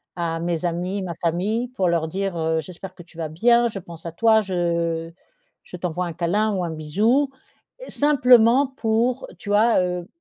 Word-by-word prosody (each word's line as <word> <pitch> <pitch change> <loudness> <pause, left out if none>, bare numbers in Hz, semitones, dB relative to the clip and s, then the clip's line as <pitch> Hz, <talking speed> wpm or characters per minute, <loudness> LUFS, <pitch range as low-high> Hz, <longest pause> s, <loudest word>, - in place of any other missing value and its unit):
à 165 -2 -2
mes 170 0 -2
amis, 180 +3 -2
ma 180 -3 -4
famille 190 +9 -1
pour 195 -8 -1
leur 165 -2 0
dire, 190 +1 -3
heu: 160 0 0
«J'espère 180 +4 -10
que 175 - -13
tu 165 0 -21
vas 160 -2 -4
bien, 235 +9 +3
je 210 -3 -5
pense 170 -2 -12
à 170 - -4
toi, 220 +5 +4
je 170 -3 -2 0.5
je 180 - -10
t'envoie 180 +1 -3
un 170 - -5
câlin 200 +6 0
ou 185 -2 -1
un 170 - -3
bisou», 210 - +1 0.6
simplement 255 -2 +4
pour 240 0 -1
tu 205 - -9
vois, 215 +1 +4
heu? 180 -1 -3
180 Hz, 180 wpm, -22 LUFS, 170-220 Hz, 0.6 s, toi